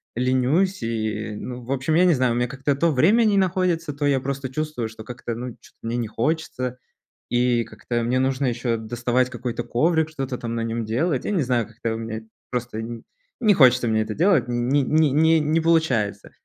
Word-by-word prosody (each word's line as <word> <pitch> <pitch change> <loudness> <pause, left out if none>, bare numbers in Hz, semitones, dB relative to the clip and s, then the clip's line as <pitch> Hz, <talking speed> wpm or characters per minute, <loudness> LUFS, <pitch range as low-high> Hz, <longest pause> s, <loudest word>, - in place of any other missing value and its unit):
ленюсь 130 - +1
и, 110 -2 -2
ну, 125 +3 -7
в 125 - -7
общем, 135 +3 0
я 180 +2 +5
не 175 - +5
знаю, 130 -4 +2
у - - -2
меня 120 0 +1
как-то 135 +2 -1
то 165 +4 +2
время 190 - +4
не 205 -2 +3
находится, 180 -4 +1
то 145 +1 -2
я 140 -2 +3
просто 135 0 -4
чувствую, 150 -5 -3
что 110 0 -11
как-то, 120 -1 -6
ну, 125 +1 -5
чё-то - - -19
мне 115 +1 -1
не 120 -2 -2
хочется, 125 0 -2 0.5
и 120 -1 +2
как-то 115 +2 -4
мне 125 +2 +1
нужно 135 +1 0
ещё 120 -1 0
доставать 120 +3 0
какой-то 120 0 -4
коврик, 160 +6 +1
что-то 135 -5 -4
там 115 -1 -5
на 115 - -2
нём 115 0 -2
делать. 130 +5 0
Я - - -1
не 185 - +1
знаю, 120 -4 0
как-то 115 0 -4
у - - -4
меня 110 0 -5 0.3
просто 120 -2 -3
н 115 +1 -6 0.4
не 215 -3 +5
хочется 125 -6 +5
мне 110 -1 +2
это 110 - -5
делать, 170 -7 +3
не 125 +4 +1
не 155 +2 +3
не 160 +3 +4
не 155 +2 +1
получается. 125 - +1
125 Hz, 210 wpm, -23 LUFS, 115-155 Hz, 0.5 s, я